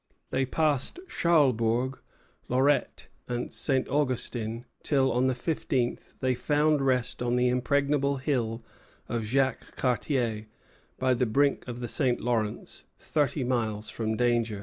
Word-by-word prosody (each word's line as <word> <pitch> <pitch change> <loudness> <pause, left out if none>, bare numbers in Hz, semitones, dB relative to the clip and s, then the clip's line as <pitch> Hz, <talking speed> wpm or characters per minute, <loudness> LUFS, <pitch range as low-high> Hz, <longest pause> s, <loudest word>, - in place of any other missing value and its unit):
They 130 0 +1
passed 150 - 0
Charlesbourg, 130 - +2 0.5
Lorette, 135 +4 +1 0.2
and 120 0 -3
St. 135 -3 0
Augustin, 120 -4 -1 0.2
till, 135 -3 +2
on 125 +2 +2
the 130 - +1
fifteenth, 125 -3 -2
they 130 0 +2
found 150 +3 +2
rest 125 -2 0
on 120 0 +1
the 125 0 +3
impregnable 140 +3 +1
hill 120 -5 -1 0.4
of 115 -2 -2
Jacques 130 +2 0
Cartier, 120 -4 0 0.5
by 130 0 +2
the 125 0 +1
brink 140 +5 +1
of 120 0 -6
the 120 - -3
St. 125 -1 +2
Lawrence, 115 -3 -2
thirty 145 -3 0
miles 110 -4 -1
from 110 -1 -2
danger. 120 -3 +1
125 Hz, 130 wpm, -28 LUFS, 120-140 Hz, 0.5 s, the